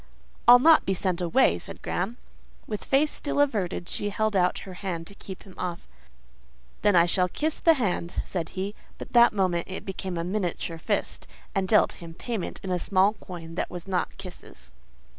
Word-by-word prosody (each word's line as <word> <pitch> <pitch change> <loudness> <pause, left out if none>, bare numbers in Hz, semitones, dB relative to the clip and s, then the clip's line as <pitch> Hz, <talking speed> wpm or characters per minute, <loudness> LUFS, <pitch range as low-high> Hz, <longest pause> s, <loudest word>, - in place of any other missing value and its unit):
"I'll 245 +1 +11
not 315 +5 +6
be 190 - 0
sent 185 -1 -1
away," 175 +10 +3
said - - -8
Graham. 195 +7 -2 0.5
With 210 -2 -5
face 290 +3 +3
still 285 - -2
averted, 200 -11 0
she 205 - -3
held 215 0 0
out 180 -1 +3
her 190 - -8
hand 180 -3 -4
to 200 - -9
keep 190 -1 -9
him 190 - -14
off. 175 -2 -4 0.9
"Then, 205 - +4
I 170 -1 +7
shall 180 +1 +1
kiss 310 - -2
the 330 -1 +5
hand," 185 - -1
said 170 -3 -3
he; 195 +2 -2 0.2
but - - -9
that 240 -1 +7
moment 185 -4 0
it 190 - -5
became 190 -2 -4
a 165 - -1
miniature 175 -3 -2
fist, - - -2 0.3
and 195 -2 0
dealt 210 -2 +3
him 165 -1 -9
payment 225 -1 -4
in 190 - -3
a 180 - +1
small 195 +3 +3
coin 175 -5 -9
that 170 - -2
was 175 +1 -7
not 185 -2 -1
kisses. 70 - -10
190 Hz, 190 wpm, -26 LUFS, 175-215 Hz, 0.9 s, I'll